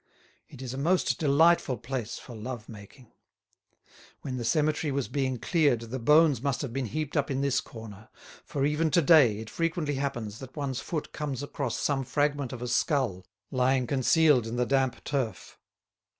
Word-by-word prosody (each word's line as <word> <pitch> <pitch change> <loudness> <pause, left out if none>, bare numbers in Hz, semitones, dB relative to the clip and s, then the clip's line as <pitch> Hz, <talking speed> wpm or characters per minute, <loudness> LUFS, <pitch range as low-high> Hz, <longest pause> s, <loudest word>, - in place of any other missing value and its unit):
It 130 - -10
is 125 -1 -5
a 135 - -5
most 175 +6 +1
delightful 155 -2 +3
place 120 0 -4
for 120 - -10
love 115 0 -6
making. 110 +3 -13 1.1
When 130 -2 -4
the 120 - -3
cemetery 150 +3 +1
was 135 -1 -1
being 130 -1 -1
cleared 145 -4 +2
the 115 +3 -5
bones 150 +2 +4
must 135 0 -1
have 130 -5 -5
been 135 -2 -2
heaped 150 +7 -4
up 145 - +1
in 135 -1 -1
this 140 -2 +1
corner; 110 -2 -11 0.3
for 140 -1 -2
even 150 +2 +1
to 170 +4 +4
day 140 -9 +6
it 110 0 -7
frequently 165 -3 -1
happens 120 -6 -3
that 130 -1 -10
one's 140 -3 -2
foot 160 -4 -4
comes 145 -3 -4
across 140 -4 -3
some 140 -2 0
fragment 145 0 0
of 125 -2 -6
a - - -3
skull 120 - 0 0.2
lying 130 0 +2
concealed 130 0 +3
in 115 - -4
the 125 0 +1
damp 130 -1 0
turf. 125 -9 -3
135 Hz, 180 wpm, -28 LUFS, 120-145 Hz, 1.1 s, day